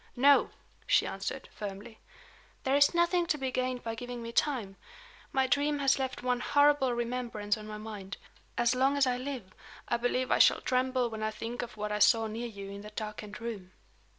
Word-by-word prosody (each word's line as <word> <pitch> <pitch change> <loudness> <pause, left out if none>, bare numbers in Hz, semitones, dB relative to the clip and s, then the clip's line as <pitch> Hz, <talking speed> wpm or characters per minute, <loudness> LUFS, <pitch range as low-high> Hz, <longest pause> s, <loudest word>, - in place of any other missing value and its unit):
"No," 280 +3 +5 0.4
she - - +4
answered, - - -4
firmly. 210 +2 -7 0.6
"There 265 +1 +2
is 285 +4 +5
nothing 345 0 +3
to 305 - +1
be 265 -2 -2
gained 255 -1 -2
by 225 - -3
giving 245 +1 -6
me 230 - -5
time. 235 -8 0 0.6
My 265 0 +2
dream 285 +3 +1
has 275 -1 +3
left 260 -1 -3
one 250 -1 +1
horrible 285 -1 +4
remembrance 235 -3 -2
on 215 -1 -9
my 215 0 -6
mind. 210 -2 -7 0.4
As 240 +1 +3
long 265 +3 +2
as 280 - +4
I 250 -1 +1
live, 255 -7 -6 0.3
I 235 - +1
believe 250 +2 0
I - - +4
shall - - +6
tremble 255 -1 +1
when 220 -1 -5
I 215 - 0
think 225 +3 -5
of 240 -2 -7
what 210 0 -3
I 210 - -1
saw 225 +1 +5
near 225 +2 -4
you 200 -3 -8
in 200 0 -7
that 210 0 -11
darkened 210 -1 -6
room." 210 -6 -6
240 Hz, 200 wpm, -30 LUFS, 215-260 Hz, 0.6 s, shall